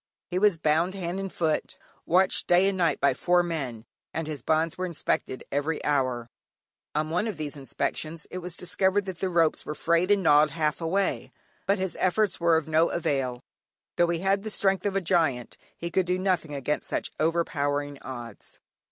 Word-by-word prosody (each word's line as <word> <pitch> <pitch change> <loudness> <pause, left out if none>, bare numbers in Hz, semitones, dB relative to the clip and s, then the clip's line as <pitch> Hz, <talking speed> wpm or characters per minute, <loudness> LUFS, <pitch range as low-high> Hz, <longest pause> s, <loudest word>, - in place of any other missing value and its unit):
He 180 - +1
was 205 -3 +4
bound 160 +4 +1
hand 180 0 -3
and 195 -1 -4
foot, 160 -3 -1 0.3
watched 185 +2 +3
night 175 - +6
and 195 -1 0
day 170 -2 +3
by 140 - +3
four 175 +6 +2
men, 135 -10 -4 0.3
and 160 - -1
his 150 -4 -5
bonds 160 +4 +1
were 185 0 -2
inspected 155 -5 -2
every 145 +3 0
hour; 130 -5 0 0.7
on 155 +1 0
one 180 +7 0
of 215 - -4
these 150 -2 -4
inspections 155 +3 -3
it 185 - -4
was 180 -1 -6
discovered 190 +3 +1
that 185 -3 -6
the 190 - -1
ropes 165 -3 +2
were 150 - -5
frayed 170 +4 +2
and 200 -2 +3
gnawed 150 -1 +6
half 155 +1 -1
away. 190 +4 0 0.4
But 200 +1 +3
his 190 -1 -2
efforts 190 +1 +1
were 170 -1 +4
of 160 -1 -3
no 160 +1 +3
avail; 135 -6 -1 0.6
though 175 - +4
he 170 -1 -1
had 195 +1 +2
the 215 - -5
strength 195 -1 +1
of 195 - -2
a 195 - +2
giant 160 -9 +1 0.2
he 170 0 -5
could 185 0 +1
do 180 0 +1
nothing 180 -5 0
against 140 +2 -2
such - - -2
overpowering 145 -3 0
odds. 120 -4 -9
165 Hz, 190 wpm, -27 LUFS, 150-185 Hz, 0.7 s, night